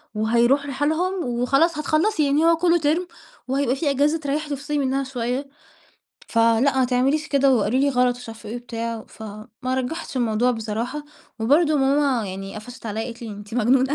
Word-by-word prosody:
وهيروح 235 +6 +2
لحالهم 315 +6 -1
وخلاص 275 +7 +2
هتخلّصي 310 +3 +1
يعني 285 +3 +2
هو 335 0 +5
كلّه 345 +1 +3
term 310 +2 +2 0.5
وهيبقى 265 -1 +1
في 285 +2 0
أجازة 290 +4 +2
تريّحِي 295 0 -2
وتفصلي 285 +2 -3
منّها 270 -1 0
شوية، 260 +1 -3 0.8
فلأ 230 +4 +3
ما 260 - +4
تعمليش 265 +5 +1
كده" 275 -2 +4
وقالوا 230 +2 +1
لي 280 - +3
غلط 250 -1 +2
ومش 245 -1 -11
عارفة 225 -1 -9
إيه 230 - -4
وبتاع 230 -1 -4
وف 220 0 -12 0.4
ما 255 +1 0
رجّحتش 260 +3 -3
الموضوع 240 0 +2
بصراحة، 230 +5 -3 0.3
وبرضه 295 +8 +3
ماما 270 -4 +2
يعني 195 +1 -6
قفشت 235 +3 -9
عليّا 220 +1 -3
قالت 235 -1 -8
لي: 230 - -6
"أنتِ 205 +1 -9
مجنونة 255 +4 +3
260 Hz, 170 wpm, -23 LUFS, 235-290 Hz, 0.8 s, هو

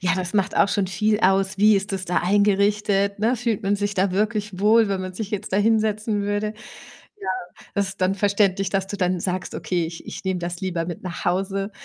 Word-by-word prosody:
Ja, 185 0 +1
das 185 +2 -3
macht 195 -1 +1
auch - - +4
schon 200 -1 0
viel 210 +3 +1
aus. 190 +1 +3
Wie 210 +2 +5
ist 195 +1 -1
es 185 -1 -3
da 180 - +1
eingerichtet, 200 +1 +2
ne? 230 +4 +2
Fühlt 230 -3 -2
man 200 +1 +1
sich 205 0 -2
da 190 -1 +1
wirklich 210 -1 -1
wohl, 220 +1 +5
wenn 195 -1 -1
man 185 -1 -6
sich 210 0 -5
jetzt 210 -1 -4
da - - +3
hinsetzen 215 0 +1
würde? 205 +1 -1 0.7
Ja, 190 - -5 0.5
das 200 -1 +1
ist 195 - -9
dann 185 +1 +2
verständlich, 200 -1 +1
dass 195 -1 0
du 205 +1 -5
dann 180 -1 0
sagst: 185 0 -3
„Okay, 175 -3 -1
ich 165 +1 -9
ich - - -7
nehme 190 -1 0
das 175 0 -4
lieber 175 -3 -2
mit 175 -2 -6
nach 180 -2 -6
Hause.“ 195 +3 -1
195 Hz, 225 wpm, -23 LUFS, 185-210 Hz, 0.7 s, Wie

